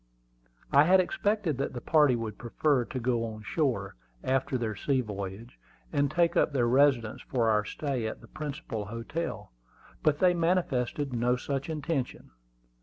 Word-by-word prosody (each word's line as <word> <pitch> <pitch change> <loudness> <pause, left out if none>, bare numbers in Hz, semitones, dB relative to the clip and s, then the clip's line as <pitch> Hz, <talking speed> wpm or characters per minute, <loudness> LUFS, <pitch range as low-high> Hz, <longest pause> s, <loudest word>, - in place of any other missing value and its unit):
I 140 +2 +6
had 185 +3 +6
expected 185 - 0
that 140 - -2
the 125 - -4
party 150 -2 +4
would 110 -3 -5
prefer 125 +2 +1
to 130 - -5
go 120 -1 0
on 110 -2 -6
shore, 120 - -1 0.3
after 130 0 0
their 110 -3 -2
sea 135 +7 0
voyage, 105 +2 -7 0.3
and 145 -1 +2
take 170 +1 +2
up - - +3
their 120 -4 +2
residence 130 -3 +3
for 115 -4 +1
our 105 -1 +3
stay 130 0 -3
at 110 - -5
the - - -15
principal 140 -8 -5
hotel; 115 - -5 0.5
but 150 -1 +3
they 180 +1 +4
manifested 150 -6 0
no 120 +1 +2
such 135 +3 -3
intention. 150 - -3
130 Hz, 160 wpm, -29 LUFS, 115-150 Hz, 0.5 s, I